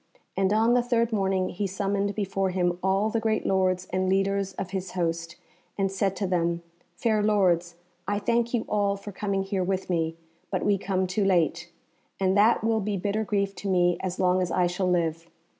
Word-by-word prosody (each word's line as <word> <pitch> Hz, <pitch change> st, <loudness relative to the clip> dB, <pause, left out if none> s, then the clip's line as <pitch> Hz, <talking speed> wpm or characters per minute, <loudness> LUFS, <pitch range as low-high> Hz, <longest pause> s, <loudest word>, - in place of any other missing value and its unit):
And 190 Hz, 0 st, +1 dB
on 225 Hz, +3 st, +3 dB
the 245 Hz, -, +4 dB
third 235 Hz, -1 st, 0 dB
morning 190 Hz, -2 st, +1 dB
he 200 Hz, +2 st, -2 dB
summoned 200 Hz, +1 st, -1 dB
before 195 Hz, -2 st, -1 dB
him 175 Hz, -1 st, 0 dB
all 195 Hz, +3 st, +1 dB
the 230 Hz, -, +1 dB
great 220 Hz, -1 st, 0 dB
lords 185 Hz, -1 st, +1 dB
and 185 Hz, 0 st, +1 dB
leaders 195 Hz, 0 st, +1 dB
of 185 Hz, 0 st, -5 dB
his 190 Hz, -2 st, -4 dB
host, 165 Hz, -1 st, -2 dB, 0.4 s
and 195 Hz, -1 st, 0 dB
said 195 Hz, 0 st, 0 dB
to 200 Hz, -, -2 dB
them, 170 Hz, -2 st, 0 dB, 0.3 s
"Fair 215 Hz, +2 st, +1 dB
lords, 180 Hz, -5 st, +2 dB, 0.3 s
I 205 Hz, -, 0 dB
thank 235 Hz, +2 st, 0 dB
you 240 Hz, -3 st, 0 dB
all 200 Hz, -1 st, +1 dB
for 200 Hz, +1 st, -8 dB
coming 195 Hz, 0 st, -2 dB
here 195 Hz, -1 st, -1 dB
with 190 Hz, 0 st, -2 dB
me, 165 Hz, -1 st, 0 dB, 0.3 s
but -, -, -2 dB
we 200 Hz, -2 st, +2 dB
come 190 Hz, -1 st, 0 dB
too 185 Hz, +3 st, -1 dB
late, 180 Hz, -5 st, +1 dB, 0.5 s
and 190 Hz, 0 st, +2 dB
that 215 Hz, +2 st, +4 dB
will 225 Hz, 0 st, +2 dB
be 205 Hz, 0 st, -2 dB
bitter 205 Hz, +3 st, -1 dB
grief 200 Hz, -2 st, -1 dB
to 200 Hz, -, -4 dB
me 175 Hz, -1 st, +3 dB
as 185 Hz, -1 st, -3 dB
long 185 Hz, 0 st, +3 dB
as 180 Hz, -, -1 dB
I 180 Hz, -, +2 dB
shall 180 Hz, +1 st, -1 dB
live. 165 Hz, -1 st, -1 dB
195 Hz, 200 wpm, -26 LUFS, 180-205 Hz, 0.5 s, the